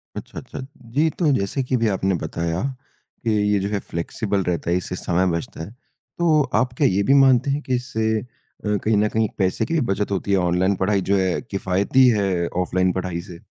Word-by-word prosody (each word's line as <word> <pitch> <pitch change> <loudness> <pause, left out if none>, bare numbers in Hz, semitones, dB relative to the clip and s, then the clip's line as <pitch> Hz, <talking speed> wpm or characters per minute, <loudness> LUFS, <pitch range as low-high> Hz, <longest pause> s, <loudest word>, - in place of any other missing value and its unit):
अच्छा, - - -7
अच्छा। - - -9 0.3
जी, 155 +3 +3
तो 155 -2 +1
जैसे 100 +4 -1
कि 130 +1 -1
अभी 115 -2 +1
आपने 95 -1 +1
बताया, 85 0 -2 0.6
कि 115 - +1 0.2
ये 100 - +3
जो 100 +1 -2
है 105 -1 -1
फ़्लेक्सिबल 100 +3 -2
रहता 85 -2 -2
है, 85 - +2
इससे 90 0 -4
समय 90 0 0
बचता 80 - -7
है, 80 - -8 0.5
तो 160 -3 +4
आप 125 -1 +1
क्या 145 - +4
ये 95 +2 +1
भी 135 - +3
मानते 130 +1 +4
हैं 145 +2 -1
कि 130 - -1
इससे 110 -3 -1 0.5
अ, 105 0 +1
कहीं 110 0 +2
न 105 +1 +3
कहीं 110 0 +2
पैसे 95 -2 +1
की 165 - -4
भी 165 - +2
बचत 100 +1 -1
होती 100 +1 -1
है, 100 - +4
ऑनलाइन 90 +2 +2
पढ़ाई 95 +1 +1
जो 100 - +4
है 95 -2 0
किफ़ायती 100 +7 +2
है, 95 -6 +1
ऑफलाइन 90 0 +1
पढ़ाई 90 -2 -3
से? 90 -2 -11
100 Hz, 215 wpm, -22 LUFS, 95-120 Hz, 0.6 s, तो